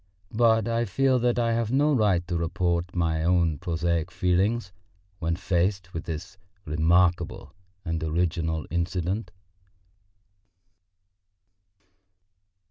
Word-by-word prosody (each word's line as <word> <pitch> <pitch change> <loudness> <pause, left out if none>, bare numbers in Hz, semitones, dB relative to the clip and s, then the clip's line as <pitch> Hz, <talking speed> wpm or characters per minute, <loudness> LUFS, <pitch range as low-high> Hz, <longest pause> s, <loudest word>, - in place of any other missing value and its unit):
But 115 -1 +3
I 115 0 0
feel 130 +5 +2
that 120 0 +1
I 115 -1 +1
have 115 -1 -1
no 145 +3 +3
right 100 - +2
to 90 - -2
report 85 +1 -1
my 80 -2 0
own 85 -4 +2
prosaic 85 -1 -1
feelings 90 +3 0 0.5
when 85 -1 -1
faced 90 +1 -1
with 85 - -5
this 85 +4 -6 0.3
remarkable 85 +3 +1 0.3
and 80 -2 -2
original 80 -1 -1
incident. 90 +4 -2
90 Hz, 105 wpm, -26 LUFS, 85-105 Hz, 0.5 s, But